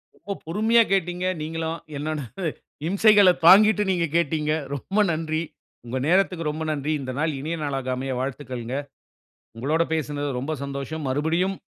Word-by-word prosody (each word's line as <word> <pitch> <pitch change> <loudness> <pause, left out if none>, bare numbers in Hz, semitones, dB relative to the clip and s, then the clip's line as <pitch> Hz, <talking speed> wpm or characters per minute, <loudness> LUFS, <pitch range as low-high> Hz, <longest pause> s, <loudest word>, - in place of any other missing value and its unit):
ரொம்ப 200 +3 -6
பொறுமையா 220 +7 +4
கேட்டீங்க, 180 -1 0 0.2
நீங்களும். 160 +1 -3 0.2
என்னோட 155 +2 -3 0.7
இம்சைகள 205 +1 +6 0.2
தாங்கிட்டு 210 +4 +7
நீங்க 175 -2 +1
கேட்டீங்க. 155 -2 0 0.2
ரொம்ப 190 +9 -2
நன்றி. 160 0 -1 0.4
உங்கள் 130 +2 -3
நேரத்துக்கு 180 -2 +2
ரொம்ப 155 +1 -4
நன்றி. 150 0 -2
இந்த 130 -1 -4
நாள் 155 +1 +1
இனிய 155 +5 -3
நாளாக 135 -3 -2
அமைய 130 +1 -3
வாழ்த்துக்கள்ங்க. 130 -2 -4 0.8
உங்களோட 150 +8 +1
பேசுனதுல 145 -3 -2
ரொம்ப 145 +5 -3
சந்தோஷம். 140 +3 -5
மறுபடியும் 165 +8 0
155 Hz, 135 wpm, -24 LUFS, 140-180 Hz, 0.8 s, தாங்கிட்டு